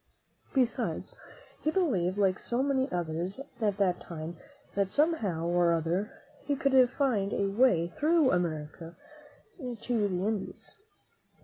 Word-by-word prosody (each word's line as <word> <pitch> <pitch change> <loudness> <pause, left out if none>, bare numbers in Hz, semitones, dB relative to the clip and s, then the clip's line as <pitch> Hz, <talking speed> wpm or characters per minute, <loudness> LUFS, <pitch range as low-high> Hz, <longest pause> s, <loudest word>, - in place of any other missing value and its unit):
Be 260 -2 +6
sides, 235 - -4 0.5
he 310 - +1
believed, 210 - +1
like 190 -2 +2
so 245 +2 -1
many 270 -1 +1
others 175 +3 -3 0.2
at 205 -2 +1
that 185 -3 +2
time, 165 0 -7 0.4
that 200 -1 +1
somehow 215 - +1
or 175 0 +3
other 170 +6 -2 0.2
he 285 - 0
could 265 -2 +4
find 240 -8 0
a 200 - +1
way 195 -5 +3
through 305 - +3
America 165 -1 -2 0.6
to 240 -4 -1
the 185 -1 -2
Indies. 215 -2 -4
200 Hz, 130 wpm, -30 LUFS, 175-260 Hz, 0.6 s, Be